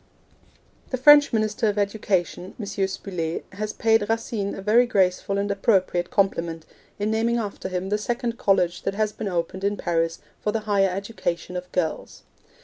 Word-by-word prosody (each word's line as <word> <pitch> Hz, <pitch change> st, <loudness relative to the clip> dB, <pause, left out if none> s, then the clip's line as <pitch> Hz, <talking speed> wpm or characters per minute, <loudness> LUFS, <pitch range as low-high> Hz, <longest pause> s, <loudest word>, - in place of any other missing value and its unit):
The 255 Hz, -, -1 dB
French 290 Hz, +2 st, +7 dB
Minister 215 Hz, -1 st, 0 dB
of 205 Hz, -, -2 dB
Education, 195 Hz, -3 st, -1 dB
M. 210 Hz, -, -4 dB
Spuller, 190 Hz, -4 st, -3 dB
has 210 Hz, +2 st, -4 dB
paid 225 Hz, -2 st, +2 dB
Racine 225 Hz, -3 st, -1 dB
a -, -, -7 dB
very 235 Hz, +4 st, +4 dB
graceful 195 Hz, -2 st, +1 dB
and 200 Hz, 0 st, 0 dB
appropriate 190 Hz, -3 st, +1 dB
compliment, 170 Hz, -5 st, 0 dB, 0.3 s
in 210 Hz, +1 st, -1 dB
naming 230 Hz, +2 st, +1 dB
after 205 Hz, -4 st, -4 dB
him 185 Hz, +1 st, -3 dB
the 210 Hz, +1 st, 0 dB
second 235 Hz, +1 st, -2 dB
college 180 Hz, -3 st, +2 dB
that 195 Hz, -, -2 dB
has 215 Hz, 0 st, 0 dB
been 210 Hz, -, -5 dB
opened 180 Hz, +1 st, -2 dB
in 205 Hz, +1 st, 0 dB
Paris 165 Hz, -1 st, 0 dB, 0.2 s
for 210 Hz, -, -1 dB
the 225 Hz, +1 st, -1 dB
higher 200 Hz, -2 st, +2 dB
education 180 Hz, -2 st, -4 dB
of 180 Hz, 0 st, -6 dB
girls. 165 Hz, -3 st, -3 dB
200 Hz, 165 wpm, -24 LUFS, 180-220 Hz, 0.3 s, French